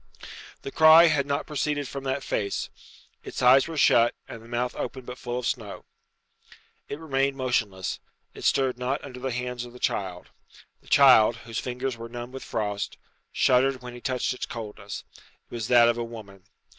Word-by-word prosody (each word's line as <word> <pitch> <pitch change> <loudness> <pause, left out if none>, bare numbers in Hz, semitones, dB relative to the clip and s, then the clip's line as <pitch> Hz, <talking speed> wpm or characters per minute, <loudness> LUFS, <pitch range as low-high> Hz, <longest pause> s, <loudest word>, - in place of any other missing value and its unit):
The 135 - -6
cry 160 +2 +8
had 145 -3 +1
not 140 +1 -1
proceeded 145 -1 -2
from 140 +1 -7
that 135 +1 -2
face. 100 -1 -2 0.5
Its - - -5
eyes 130 +3 +6
were 165 -1 -6
shut, 120 -4 +4
and 115 - -9
the 115 - -15
mouth 120 +1 -2
open 130 -2 -5
but 125 +1 -8
full 120 0 -4
of 125 - -4
snow. 110 -7 -4 1.0
It 140 - -4
remained 140 -3 -1
motionless; 110 -8 -1 0.3
it - - -11
stirred 130 -2 +1
not 130 +3 -2
under 125 -3 -9
the 130 +1 -3
hands 125 0 -4
of 120 0 -11
the 125 - -12
child. 90 -6 -3 0.5
The - - -25
child, 125 -5 +6
whose 115 -2 -4
fingers 125 0 -4
were 115 0 -8
numbed 120 +1 -7
with 135 - -7
frost, 105 -2 -3 0.3
shuddered 130 0 +2
when 125 -1 -8
he 120 - -10
touched 130 0 -1
its 125 - -5
coldness. 105 -3 -7 0.2
It - - -23
was 115 -3 -3
that 120 -1 +6
of 120 0 +1
a - - -1
woman. 105 -5 -11
125 Hz, 185 wpm, -26 LUFS, 115-135 Hz, 1.0 s, cry